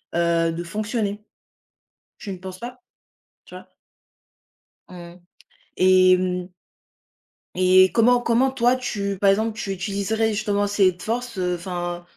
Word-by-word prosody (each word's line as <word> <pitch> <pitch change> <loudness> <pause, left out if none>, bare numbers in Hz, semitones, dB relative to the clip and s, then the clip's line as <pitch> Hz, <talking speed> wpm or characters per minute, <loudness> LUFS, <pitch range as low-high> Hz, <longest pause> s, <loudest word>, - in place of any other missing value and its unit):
heu, 170 -1 +1
de 170 +1 -5
fonctionner. 210 +2 -3 1.0
Tu 200 - -7
ne 185 - -8
penses 185 0 -9
pas? 245 +3 -9 0.6
Tu - - -14
vois? - - -11 1.2
Mmh. 175 0 -12 0.6
Et 185 0 +5
mmh 180 0 -3 1.1
et 185 +1 +5
comment 245 +2 +4
comment 240 +2 +2
toi 245 -1 +2
tu, 200 -6 -4
par 200 - +4
exemple, 215 +2 0
tu 195 - -4
utiliserais 200 +3 -1
justement 205 -1 -1
cette 195 -3 +1
force, 240 -1 -4
heu, 180 -1 -1
enfin, 175 -1 -5
195 Hz, 130 wpm, -22 LUFS, 180-220 Hz, 1.2 s, Et